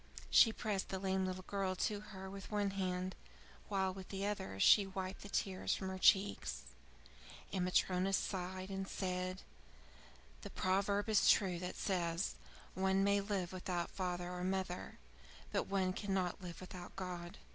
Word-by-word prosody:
She 225 - +8
pressed 210 -4 -2
the 190 - -2
lame 190 0 0
little 185 0 -4
girl 195 -2 -1
to 205 +2 0
her 190 -2 -8
with 195 0 -8
one 205 -2 +1
hand, 185 -1 -1 0.5
while 190 -2 +1
with 190 -1 -9
the 195 0 -2
other 95 - -3
she 200 - +7
wiped 190 0 -4
the 205 - -8
tears 190 -2 0
from 190 - -4
her 190 0 -4
cheeks. 190 - +3 0.9
And 185 -2 +1
Matryona 185 +1 +2
sighed, 185 0 -2
and 195 0 -3
said: 185 -1 -2 1.0
"The - - -7
proverb 200 +2 +1
is 215 -2 +5
true 185 -5 +4
that 180 0 -4
says, 170 - 0 0.4
'One 190 +1 +2
may 200 0 +4
live 195 -3 -2
without 180 -2 -2
father 180 -1 -2
or 180 0 -4
mother, 185 -1 -2 0.5
but - - 0
one 190 -2 +1
cannot 190 -2 -1
live 175 -1 -7
without 180 -1 -8
God.'" 180 -2 -5
190 Hz, 155 wpm, -37 LUFS, 180-195 Hz, 1.0 s, She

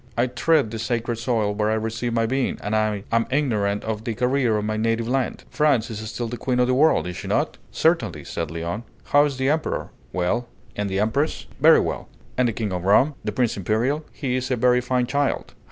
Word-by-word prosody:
I 120 - +3
tread 130 0 +2
the 115 - -5
sacred 115 +1 -1
soil 115 -3 0
where 105 +1 0
I 110 - +2
received 115 +2 -2
my 115 -1 +2
being, 130 +2 0
and 105 +2 -1
I 110 -2 0
am 115 0 +2
ignorant 105 -8 0
of 110 -1 -3
the 115 -1 -3
career 125 -2 +2
of 105 - -2
my 110 0 -1
native 115 +1 0
land. 130 +1 -1
France 140 -7 +2
is 105 - -5
still 120 +1 -3
the 120 +2 -5
queen 125 +2 -1
of 125 - +5
the 130 - +1
world, 150 +5 +4
is 90 0 -5
she 100 0 -6
not?" 145 +10 0
"Certainly," 160 - +1
said 85 - -4
Léon. 85 +6 -4 0.2
"How 145 +1 +4
is 140 -3 -3
the 130 +1 +1
Emperor?" 155 +1 -1 0.2
"Well." 90 - 0 0.3
"And 105 -1 -2
the 95 0 -1
Empress?" 110 +9 0
"Very - - +7
well." - - -4 0.3
"And 125 -1 +2
the 115 - -1
King 105 -3 -3
of 90 -1 -3
Rome?" 120 +10 +4
"The - - -2
Prince 125 -3 0
Imperial? 115 - 0
He 130 -4 -2
is 130 0 -2
a 130 - +2
very 125 +1 +3
fine 125 0 0
child." 140 +2 -1
115 Hz, 225 wpm, -23 LUFS, 105-130 Hz, 0.3 s, Very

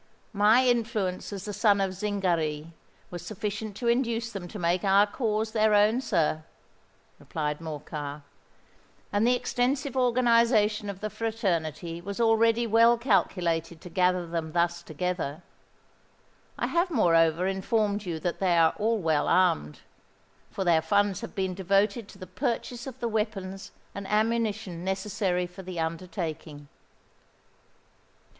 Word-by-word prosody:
"My 215 +5 +5
influence 225 -7 0
as 200 -1 -6
the 210 - -5
son 200 0 +3
of 190 -1 0
Zingary 170 -6 -1 0.4
was 175 -1 -6
sufficient 210 +2 -5
to 235 +2 -3
induce 235 -1 0
them 195 -5 -6
to 210 - -8
make 175 0 0
our 200 +1 +5
cause 220 0 -2
their 215 -1 +3
own, 215 +4 +4
sir," 155 -9 0 0.8
replied 150 -1 -3
Morcar; 150 -2 -6 0.9
"and 205 +3 +3
the 250 - +4
extensive 260 +3 -1
organization 235 -4 +3
of 195 -1 -7
the 215 0 -3
fraternity 175 - -2
was 200 +4 -6
already 230 0 +3
well 230 +2 +5
calculated 175 - 0
to 180 - -10
gather 180 0 +2
them 165 -2 -4
thus 170 0 +1
together. 170 -1 -4 1.1
I - - -1
have 345 +2 +1
moreover 165 - +3
informed 205 +2 0
you 170 -4 -4
that 175 +1 -2
they 180 -3 +2
are 165 -1 +5
all 225 +2 +1
well 160 -6 +1
armed; 75 - +2 0.7
for 195 - -3
their 170 -3 +3
funds 200 +4 +1
have 230 - -8
been 190 -2 -1
devoted 200 +4 +1
to - - -14
the 185 - -8
purchase 235 +7 -3
of 260 -1 -8
the 235 - 0
weapons 205 -4 -3 0.2
and 200 -1 -6
ammunition 215 -4 -1
necessary 190 -1 -1
for 180 +2 -10
the 185 -2 -6
undertaking." 160 -3 -5
195 Hz, 140 wpm, -27 LUFS, 175-225 Hz, 1.1 s, My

